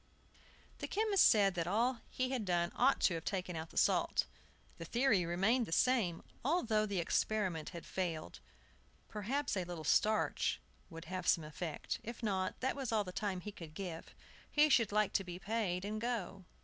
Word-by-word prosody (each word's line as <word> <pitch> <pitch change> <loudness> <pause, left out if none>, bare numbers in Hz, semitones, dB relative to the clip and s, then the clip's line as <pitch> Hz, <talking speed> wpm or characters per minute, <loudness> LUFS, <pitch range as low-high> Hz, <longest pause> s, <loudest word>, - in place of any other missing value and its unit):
The - - -3
chemist 420 -2 +4
said 200 -3 +4
that 170 -2 -2
all 230 +5 +1
he 255 0 -2
had 255 -4 -1
done 175 -2 0
ought 265 +3 +4
to 185 - +4
have 165 -1 -4
taken 185 -3 -3
out 160 0 -5
the - - -13
salt. - - +3 0.5
The 165 - -5
theory 225 -4 +2
remained 215 +8 +2
the - - -8
same, 205 -5 +2 0.2
although 230 -8 +2
the 200 -2 -2
experiment 180 -1 0
had 170 - -8
failed. 165 - -3 0.7
Perhaps 230 +6 -2
a 185 - 0
little 175 -2 -6
starch 215 +7 +2 0.3
would 165 -1 -9
have 185 +1 -4
some 165 - +4
effect. 155 +1 -4
If 235 +1 -7
not, 190 -3 -1
that 260 +1 0
was 270 -4 -3
all 215 -2 +2
the 180 - -7
time 195 -1 -2
he 210 - -6
could 165 -5 -11
give. 175 -4 -6 0.4
He 300 0 +5
should 230 -7 +4
like 210 -1 +2
to 195 - +1
be 175 -1 -7
paid, 195 -2 -2
and 215 +1 -3
go. 225 -5 -3
195 Hz, 185 wpm, -35 LUFS, 175-230 Hz, 0.7 s, He